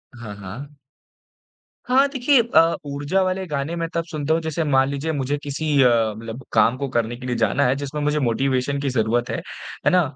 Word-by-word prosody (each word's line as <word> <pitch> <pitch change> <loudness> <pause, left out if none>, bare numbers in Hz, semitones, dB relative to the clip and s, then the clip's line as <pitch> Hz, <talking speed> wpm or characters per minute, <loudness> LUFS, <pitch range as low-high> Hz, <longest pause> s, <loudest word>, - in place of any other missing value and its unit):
हाँ, 110 -4 -8
हाँ। 125 +10 -9 1.1
हाँ, 265 +3 +4
देखिए 265 -1 +3
अ, 170 -8 +3
ऊर्जा 145 +6 -1
वाले 185 0 -1
गाने 150 +2 -3
मैं 165 -1 -2
तब 170 0 0
सुनता 155 -1 -2
हूँ 165 - +1
जैसे 160 0 -2
मान 135 -3 +3
लीजिए 140 +3 -2
मुझे 145 0 -1
किसी 145 +2 -4 0.2
अ, 125 - +6 0.3
मतलब 115 +3 -8
काम 115 +3 +4
को 140 0 -3
करने 120 0 -1
के 125 - -10
लिए 125 - -1
जाना 115 +5 +2
है 125 - +2
जिसमें 145 +1 -4
मुझे 150 +1 +1
मोटिवेशन 135 +2 0
की 140 - -1
ज़रूरत 120 0 0
है। - - -2 0.5
है - - +6
ना? 180 - +5
140 Hz, 200 wpm, -22 LUFS, 125-160 Hz, 1.1 s, अ